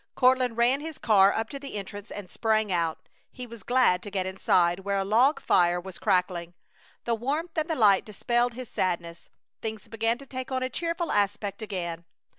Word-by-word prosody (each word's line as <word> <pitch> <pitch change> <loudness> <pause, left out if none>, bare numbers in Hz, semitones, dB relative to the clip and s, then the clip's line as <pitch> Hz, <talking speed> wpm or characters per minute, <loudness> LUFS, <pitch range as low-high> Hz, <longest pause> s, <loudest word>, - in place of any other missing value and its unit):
Courtland 255 -2 +3
ran 245 +4 +3
his 315 -1 -6
car 200 -3 +5
up 225 0 -2
to 275 - -7
the 275 -4 -8
entrance 205 +1 -7
and 205 -2 -7
sprang 215 +1 0
out. 170 -2 -1 0.2
He 250 - -8
was 235 -2 -11
glad 240 -5 +3
to 205 - -7
get 190 -2 -2
inside, 180 -2 +2
where 200 +1 -1
a 195 - 0
log 245 +9 +4
fire 175 -1 +3
was 185 0 -9
crackling. 180 -2 0 0.5
The 235 - +1
warmth 290 +9 -2
and 315 +1 -1
the 320 - 0
light 205 -6 +5
dispelled 240 +3 0
his 255 -1 -7
sadness. 170 -3 -3 0.3
Things 220 -1 -5
began 225 +1 0
to 275 - -12
take 260 -1 -6
on 260 0 -1
a 255 - -2
cheerful 335 +3 -2
aspect 205 0 0
again. 175 -5 -4
215 Hz, 195 wpm, -27 LUFS, 190-255 Hz, 0.5 s, car